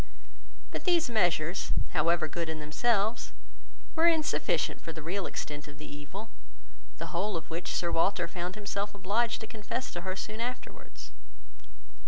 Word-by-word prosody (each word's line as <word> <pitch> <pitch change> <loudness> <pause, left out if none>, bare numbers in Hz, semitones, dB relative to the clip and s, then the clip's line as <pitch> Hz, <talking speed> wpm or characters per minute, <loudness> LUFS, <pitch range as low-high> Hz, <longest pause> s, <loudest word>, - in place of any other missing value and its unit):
But - - -4
these 340 -7 +4
measures, 175 -4 +2 0.2
however 165 +1 +3
good 165 +2 -2
in 160 -1 -2
themselves, 210 +8 +1 0.6
were 330 +1 +6
insufficient 320 -3 +2
for 165 - -5
the 160 -1 -7
real 185 +4 -1
extent 145 0 -4
of 145 -1 -10
the 150 - -8
evil, 165 +10 -7 0.7
the - - -5
whole 185 +2 +1
of 160 0 -8
which 170 +2 -2
Sir 170 - +1
Walter 175 0 +3
found 180 +1 -3
himself 205 0 -2
obliged 215 +5 +1
to - - -3
confess 230 +4 -3
to 175 - -4
her 185 +1 -2
soon 215 +3 -4
afterwards. 250 +2 -5
185 Hz, 155 wpm, -31 LUFS, 165-220 Hz, 0.7 s, were